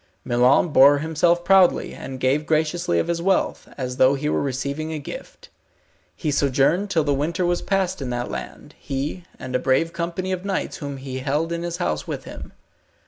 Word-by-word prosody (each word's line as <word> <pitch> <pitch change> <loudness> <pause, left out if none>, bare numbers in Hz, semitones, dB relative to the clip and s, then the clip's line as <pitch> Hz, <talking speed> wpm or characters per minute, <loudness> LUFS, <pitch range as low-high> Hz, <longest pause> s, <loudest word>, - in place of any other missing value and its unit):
Milon 125 +7 +4
bore 145 0 +7
himself 165 +3 +1
proudly, 190 -2 +4
and 130 -1 -7
gave 140 +4 +1
graciously 155 - +1
of 85 - +1
his 170 -1 -1
wealth, 190 +1 0
as 125 -2 -4
though 130 +2 +5
he 150 +2 -2
were - - +1
receiving 140 +3 -3
a 160 - -3
gift. 145 - -9 0.7
He 150 - -2
sojourned 140 +8 +2
till 165 -5 +2
the 145 -1 +1
winter 165 +6 -1
was 175 0 0
past 190 -3 -1
in 130 - -3
that 120 0 -3
land, 65 -1 -7
he, 145 +6 -4
and 130 -1 -6
a - - +3
brave 135 +6 +1
company 175 +2 -3
of 185 -1 -3
knights 195 -1 -2
whom 140 -2 -6
he 130 -1 -6
held 150 +5 -1
in 170 0 -2
his 170 0 -3
house 75 - -2
with - - -4
him. - - -9
150 Hz, 195 wpm, -23 LUFS, 135-175 Hz, 0.7 s, bore